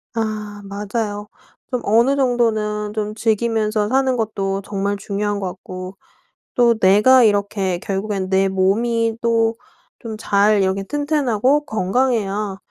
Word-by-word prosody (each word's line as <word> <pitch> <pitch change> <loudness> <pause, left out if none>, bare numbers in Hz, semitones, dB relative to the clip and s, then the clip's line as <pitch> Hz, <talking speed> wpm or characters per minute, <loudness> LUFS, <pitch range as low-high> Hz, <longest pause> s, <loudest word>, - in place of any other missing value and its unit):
아 210 -2 -3
맞아요. 205 +1 -4 0.4
좀 250 -2 -1
어느 235 +6 +3
정도는 220 -5 0
좀 210 -1 -3
즐기면서 220 -1 0
사는 260 0 +2
것도 200 -4 -2
정말 200 0 -2
중요한 205 0 -3
것 195 - -3
같고 185 +1 -8 0.6
또 240 -1 +5
내가 210 +7 +6
이렇게 200 -3 +1
결국엔 195 0 -3
내 190 0 +3
몸이 225 +4 +1
또 230 -1 +2 0.4
좀 225 -3 -6
잘 205 -1 +2
이렇게 190 +1 0
튼튼하고 285 +1 +1
건강해야 210 -2 -1
210 Hz, 250 characters per minute, -20 LUFS, 200-230 Hz, 0.6 s, 내가